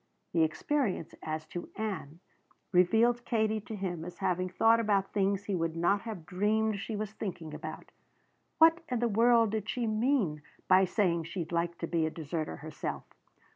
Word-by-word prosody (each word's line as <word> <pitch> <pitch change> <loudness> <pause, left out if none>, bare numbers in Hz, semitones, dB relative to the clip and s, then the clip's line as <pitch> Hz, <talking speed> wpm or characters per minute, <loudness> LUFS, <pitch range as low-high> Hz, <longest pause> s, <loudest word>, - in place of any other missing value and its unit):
The 165 - +3
experience 190 - 0
as 155 0 -4
to 175 - -6
Ann 185 -7 -4 0.5
revealed 225 +7 +4
Katie 220 -2 0
to 220 - -7
him 180 -5 -3
as 175 +1 -8
having 185 -1 0
thought 225 +5 +4
about 200 -3 +1
things 200 -1 +1
he 200 - -3
would 165 -2 -1
not 185 +4 +2
have 215 -8 -7
dreamed 210 +4 +1
she 215 +2 -4
was 215 0 -4
thinking 175 -8 -5
about. 155 +1 -7 0.7
What 325 +1 +6
in 250 - 0
the 240 +1 +1
world 230 0 +4
did 215 -1 -3
she 245 -2 -1
mean 215 - +1 0.3
by 190 +1 +6
saying 170 -4 +1
she'd 170 -1 -5
like 170 0 -1
to - - -3
be 165 -1 +1
a - - -1
deserter 155 0 -4
herself? 155 +1 -5
195 Hz, 175 wpm, -31 LUFS, 170-220 Hz, 0.7 s, What